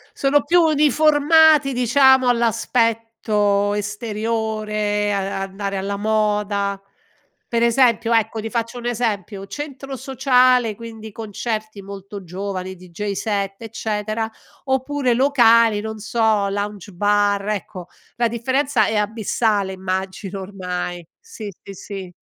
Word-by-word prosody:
Sono 280 +1 +2
più 350 +1 +4
uniformati 305 -1 +4
diciamo 260 +1 +4
all'aspetto 225 -3 +1
esteriore, 210 -1 -2
a 195 0 -2
a - - -2
andare 195 +1 -4
alla 195 +1 -2
moda. 205 -2 0 0.7
Per 235 0 0
esempio, 235 -1 +3
ecco, 225 0 +1
ti 225 - -4
faccio 235 +1 -3
un 240 - -7
esempio, 215 -5 -2
centro 275 0 -7
sociale, 255 -3 +3
quindi, 225 -1 -9
concerti 215 -1 -5
molto 200 0 -9
giovani, 185 +1 -5
DJ 185 +3 -6
set, 200 -1 -2
eccetera, 220 0 -3 0.3
oppure 265 -1 0
locali, 230 -5 +4
non 220 0 -6
so, 220 -2 +1
lounge 205 -1 -4
bar, 205 +1 +1
ecco. 195 -3 -4 0.3
La 235 -1 +2
differenza 260 0 +1
è 220 - -1
abissale, 210 -1 0
immagino, 190 +1 -4
ormai. 180 -2 -5
Sì, 455 - -9
sì, 200 - -9
sì. 190 -1 -8
215 Hz, 115 wpm, -21 LUFS, 200-240 Hz, 0.7 s, più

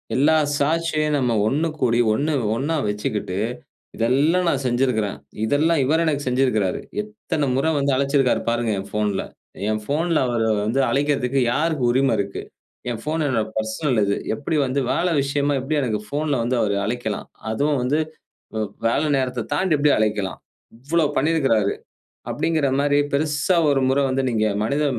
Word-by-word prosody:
எல்லா 150 +5 +4 0.2
சாட்சியும் 155 0 +1
நம்ம 125 -4 +1
ஒண்ணு 150 +7 +1
கூடி 120 -1 +2
ஒண்ணு 150 +7 0 0.2
ஒண்ணா 145 +7 -1
வச்சுக்கிட்டு 105 -2 -3 0.6
இதெல்லா 140 +10 +2
நான் 140 -4 +1
செஞ்சுருக்குறேன். 120 -5 0 0.3
இதெல்லாம் 150 +7 +2
இவரு 160 +5 +2
எனக்கு 145 -3 -1
செஞ்சுருக்குறாரு. 125 -7 +1 0.2
எத்தன 210 -9 -3
முற 135 - 0
வந்து 140 0 +1
அழைச்சுருக்காரு 135 -1 +2
பாருங்க 120 -1 0
என் 95 - -8
போன்ல. 105 -2 0 0.5
என் 110 0 -1
போன்ல 160 +3 +1
அவர 120 -2 -1 0.2
வந்து 115 +6 0
அழைக்கறத்துக்கு 140 -2 +1
யாருக்கு 155 -1 0
உரிம 130 0 +2
இருக்கு. 100 0 -3 0.5
என் 115 -2 -4
போன் 155 +1 0
என்னுடைய 115 -6 0
பெர்சனல் 110 +3 0
இது, 100 0 +1 0.2
எப்படி 145 +4 -3
வந்து 130 +2 -1
வேலை 175 0 +1
விஷயமா 140 +1 0
எப்படி 150 +4 -2
எனக்கு 110 -5 -1
போன்ல 145 -1 0
வந்து 125 +2 0
அவர் 100 -1 +1
அழைக்கலாம்? 110 -2 -3 0.2
அதுவும் 145 +5 +1
வந்து 145 +5 +1 0.6
வ 110 - -1 0.3
வேல 130 +6 +1
நேரத்தத் 130 -3 -2
தாண்டி 165 +2 +2
எப்படி 145 +1 +3
அழைக்கலாம்? 105 -5 -1 0.4
இவ்வளோ 155 +7 0
பண்ணிருக்கிறாரு. 135 -9 +2 0.6
அப்படின்கிற 160 -3 0
மாரி 145 0 +2
பெரிசா 150 +4 +1
ஒரு 135 - +2
முற 135 +2 +2
வந்து 135 +1 0
நீங்க 110 -2 +1 0.2
மனித 140 +6 0
135 Hz, 150 wpm, -22 LUFS, 115-150 Hz, 0.6 s, எல்லா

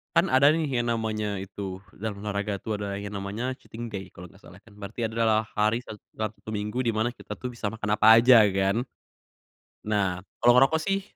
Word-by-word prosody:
Kan - - +4
ada 140 +3 +5
nih 160 -1 0 0.2
yang 120 - 0
namanya 110 -3 -2
itu 95 -1 -6 0.2
dalam 105 -1 -5
olahraga 100 -1 -3
tuh 110 -1 -3
ada 100 -1 -4
yang 100 0 -6
namanya 110 +7 -3
cheating 120 -1 -9
day 95 -3 -7
kalo 90 +1 -11
gak 95 +4 -21
salah 90 - -14
kan, 105 -1 -20
berarti 105 +3 -4
adalah 110 -1 +1
hari 110 +2 +2
sa 110 -3 -9 0.2
Sabtu 110 0 -6
Minggu 105 +4 -2
di 115 - +1
mana 110 +3 -1
kita - - -13
tuh 125 - -4
bisa 120 -4 -4
makan 105 -1 -1
apa 110 +1 +7
aja 120 -2 +7
kan, 95 +4 +1 1.0
nah 95 -4 -1 0.2
kalo 120 0 +5
ngerokok 135 +5 +5
sih, 195 +4 -1
110 Hz, 200 wpm, -26 LUFS, 100-120 Hz, 1.0 s, apa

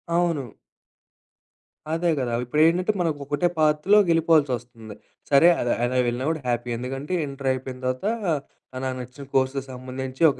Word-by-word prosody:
అవును. 165 -9 0 1.4
అదే 170 +1 +1
గదా! 120 -2 -2
ఇప్పుడు 150 +5 +1
ఏంటంటే, 180 +5 +2
మనకు 160 -4 -1
ఒకటే 145 +5 +1
పాత్‌లొకెళ్ళిపోవాల్సొస్తుంది. 150 - +2 0.3
సరే 140 +4 +6
అల - - -1 0.2
అలా 125 +1 0
వెళ్ళినా 120 +2 -2
గూడా 160 -2 -2
హ్యాపీ 120 0 -1
ఎందుకంటే, 135 +7 -5
ఇంటరు 135 -1 -3
అయిపోయిన 130 0 -6
తర్వాత 130 +6 -2 0.8
నాకు 130 -1 -2
నచ్చిన 125 +3 -10
కొర్సుకి 135 +1 +2
సంబంధించి 130 +1 -7
ఒక 130 - -10
135 Hz, 135 wpm, -24 LUFS, 125-160 Hz, 1.4 s, సరే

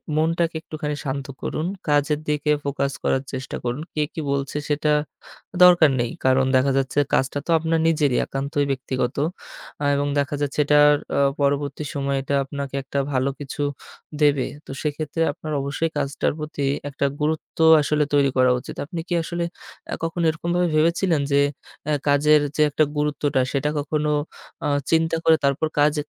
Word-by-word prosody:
মনটাকে 165 +1 +1
একটুখানি 150 -2 -4
শান্ত 135 0 -3 0.2
করুন। 155 - -3 0.2
কাজের 145 +1 +2
দিকে 150 0 +1
ফোকাস 140 -1 -1
করার 135 0 +1
চেষ্টা 130 0 -5
করুন। 125 +4 -2
কে 155 - -1
কি - - -5
বলছে 140 +1 -2
সেটা 150 +1 +1 0.7
দরকার 175 -4 +7
নেই। 120 -1 -1
কারণ 130 0 +4
দেখা 135 +1 +3
যাচ্ছে, 135 +1 -2 0.2
কাজটা 135 +2 +1
তো - - -2
আপনার 165 +1 0
নিজেরই 150 -5 +2
একান্তই 140 +2 -1
ব্যক্তিগত। 130 -1 -2 0.8
এবং 145 0 0
দেখা 140 +1 0
যাচ্ছে, 145 +1 -3
এটা 150 +1 +4 0.4
আ - - +2 0.2
পরবর্তী 140 +1 0
সময় 140 -1 -1
এটা 140 +1 -2
আপনাকে 140 0 -6
একটা 135 +1 -4
ভালো 130 +1 +1
কিছু 145 +1 -5 0.6
দেবে। 145 -3 +3 0.2
তো - - -11
সেক্ষেত্রে 155 +2 -2
আপনার 155 0 -7
অবশ্যই 145 +4 -2
কাজটার 140 0 -1
প্রতি 150 -2 -5 0.3
একটা 140 0 -1
গুরুত্ব 155 +2 -2 0.2
আসলে 150 +1 +1
তৈরি 140 -1 +4
করা 130 0 +5
উচিত। - - -9
আপনি 170 +1 -5
কি 175 - -1
আসলে 170 +1 -3 0.5
আ - - +1
কখনো 165 +1 -2
এরকমভাবে 175 +2 0
ভেবেছিলেন 165 0 +2
যে 140 - +5 0.5
আ - - +2 0.2
কাজের 150 +1 +5 0.2
যে 155 - +3
একটা 155 +2 +3
গুরুত্বটা 145 -2 0
সেটা 145 +1 0
কখনো 150 +1 -1 0.6
অ - - +1 0.2
চিন্তা 165 0 +2
করে, 160 0 +6
তারপর 140 +3 +2
কাজ 150 0 +4
145 Hz, 160 wpm, -23 LUFS, 140-155 Hz, 0.8 s, দরকার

